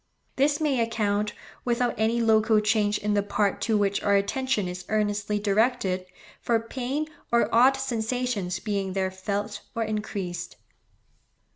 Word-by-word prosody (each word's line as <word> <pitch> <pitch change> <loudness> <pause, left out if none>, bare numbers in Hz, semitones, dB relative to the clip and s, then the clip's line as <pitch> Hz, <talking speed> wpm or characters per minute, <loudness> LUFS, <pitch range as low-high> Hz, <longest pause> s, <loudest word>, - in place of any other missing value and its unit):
This 290 +2 +2
may 290 -5 +1
account, 210 -2 0 0.3
without 240 0 +1
any 225 +2 +1
local 220 -1 +4
change 210 -1 +2
in 210 0 -1
the 205 - +3
part 200 0 0
to 220 -2 +2
which 200 -1 +1
our 200 -1 +3
attention 210 +1 0
is 180 0 -6
earnestly 210 -1 0
directed, 200 -3 +1 0.3
for 230 -1 +2
pain 260 +6 -3 0.3
or 235 0 +2
odd 255 +4 +6
sensations 235 -6 -2
being 195 -2 -2
there 190 -1 0
felt 200 +2 -3
or 230 - 0
increased. 210 -4 -4
215 Hz, 140 wpm, -26 LUFS, 200-235 Hz, 0.3 s, odd